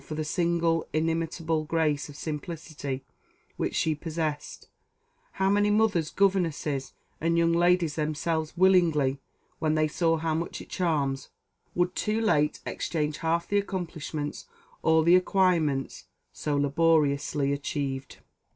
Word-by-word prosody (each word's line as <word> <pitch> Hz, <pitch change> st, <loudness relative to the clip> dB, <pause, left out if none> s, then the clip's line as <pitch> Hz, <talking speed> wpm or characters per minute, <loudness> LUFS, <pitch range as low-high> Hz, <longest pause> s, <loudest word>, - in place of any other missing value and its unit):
For 155 Hz, -, -6 dB
the 155 Hz, -, -2 dB
single 170 Hz, 0 st, +1 dB
inimitable 165 Hz, 0 st, 0 dB
grace 155 Hz, -3 st, 0 dB
of 145 Hz, -, -11 dB
simplicity 150 Hz, -3 st, -5 dB, 0.5 s
which -, -, -2 dB
she 160 Hz, -, +2 dB
possessed, 155 Hz, -1 st, -4 dB, 0.7 s
how 190 Hz, -, 0 dB
many 205 Hz, +1 st, +3 dB
mothers, 205 Hz, -7 st, +2 dB
governesses, 165 Hz, -8 st, 0 dB, 0.3 s
and 165 Hz, +1 st, +1 dB
young 170 Hz, 0 st, +3 dB
ladies 175 Hz, -2 st, +2 dB
themselves, 155 Hz, +1 st, -2 dB
willingly, 165 Hz, -7 st, +4 dB, 0.4 s
when 155 Hz, -1 st, +1 dB
they 155 Hz, 0 st, +2 dB
see 165 Hz, +1 st, +1 dB
how 160 Hz, 0 st, -1 dB
much 165 Hz, +2 st, -3 dB
it -, -, -11 dB
charms, 145 Hz, -6 st, -1 dB, 0.5 s
would 175 Hz, +1 st, +1 dB
too 215 Hz, +3 st, -1 dB
late 150 Hz, -9 st, +1 dB
exchange 150 Hz, -2 st, -2 dB
half 170 Hz, +1 st, 0 dB
the 205 Hz, -, +2 dB
accomplishments, 165 Hz, -6 st, -4 dB, 0.3 s
all 160 Hz, 0 st, +4 dB
the 170 Hz, +2 st, +6 dB
acquirements, 175 Hz, -7 st, +1 dB, 0.3 s
so 150 Hz, -1 st, -2 dB
laboriously 145 Hz, -1 st, +2 dB
achieved! 140 Hz, -2 st, -4 dB
160 Hz, 125 wpm, -27 LUFS, 150-170 Hz, 0.7 s, the